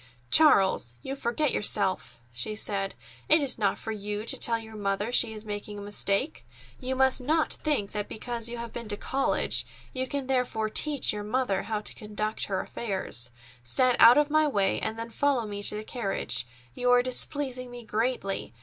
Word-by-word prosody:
"Charles, 195 - +5
you 270 - -4
forget 275 +3 0
yourself!" 195 - 0
she 125 - -3
said. 195 -2 -1 0.3
"It 310 0 +7
is 270 - -1
not 200 -3 +1
for 220 - -5
you 210 0 -4
to - - +1
tell 230 -1 +1
your 220 -1 -10
mother 205 +2 -1
she 240 -2 +2
is 215 0 -8
making 205 0 -5
a - - -7
mistake. 205 +7 -1 0.4
You 260 0 -3
must 265 0 +4
not 310 +5 +1
think 285 -10 -1
that 210 -1 -4
because 235 0 -3
you 240 - -5
have 235 -1 -7
been 235 -2 -6
to 205 -1 0
college 270 +5 0 0.3
you 260 0 -2
can 280 0 -3
therefore 250 -4 0
teach 290 0 +2
your 210 - -4
mother 210 -2 0
how 215 -2 -3
to - - -5
conduct 215 0 -3
her 190 -2 -1
affairs. 190 - -3 0.3
Stand 245 - +3
out 235 +3 +9
of 295 0 +3
my 310 0 +4
way, 200 -8 +1
and 220 - -3
then 230 0 -6
follow 275 -2 +1
me 205 -1 -5
to 205 - -1
the 210 - -4
carriage. 195 - -2 0.3
You 250 0 0
are 245 0 +5
displeasing 255 0 +1
me 245 -1 -10
greatly. 215 - -2
225 Hz, 190 wpm, -28 LUFS, 205-255 Hz, 0.4 s, out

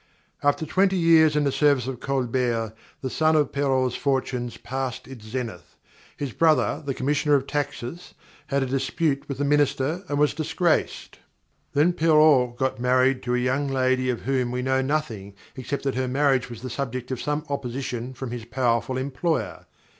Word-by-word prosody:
_ 145 - +6
_After 160 - -6
twenty 190 +3 +2
years 160 -3 +5
in 150 - +2
the 140 - +1
service 140 -3 +3
of 130 -2 -5
Colbert, 125 -4 -1 0.3
the 130 - -3
sun 155 0 +2
of 150 -3 +2
Perrault's 130 -3 +1
fortunes 130 -3 -1
passed 130 -1 -4
its 130 -5 -11
zenith. 110 -6 -6 0.4
His 140 -3 -3
brother, 160 +4 +2
the 140 -2 -3
Commissioner 145 +2 +2
of 135 -1 +1
Taxes, 145 +2 -4 0.3
had 140 -1 +1
a - - -1
dispute 135 +2 -1
with 140 - -3
the 145 - 0
Minister 145 +3 +1
and 145 - -1
was 150 0 +3
disgraced. 160 +1 -1 0.5
Then 155 +5 +3
Perrault 150 -7 +4
got 130 -1 -1
married 130 +1 +3
to 125 0 -1
a - - +2
young 130 +3 0
lady 130 -1 +1
of 125 - -2
whom 130 -1 0
we 125 +1 -2
know 130 0 +1
nothing 120 -9 -3 0.2
except 135 +2 -4
that 135 -1 0
her 130 0 -1
marriage 135 -1 +1
was 120 0 -9
the 130 - -5
subject 125 -1 -4
of 130 - -3
some 150 +1 -2
opposition 130 -2 -4
from 130 -1 -6
his 120 -2 -6
powerful 120 0 0
employer. 140 +5 -2
135 Hz, 175 wpm, -24 LUFS, 125-145 Hz, 0.5 s, _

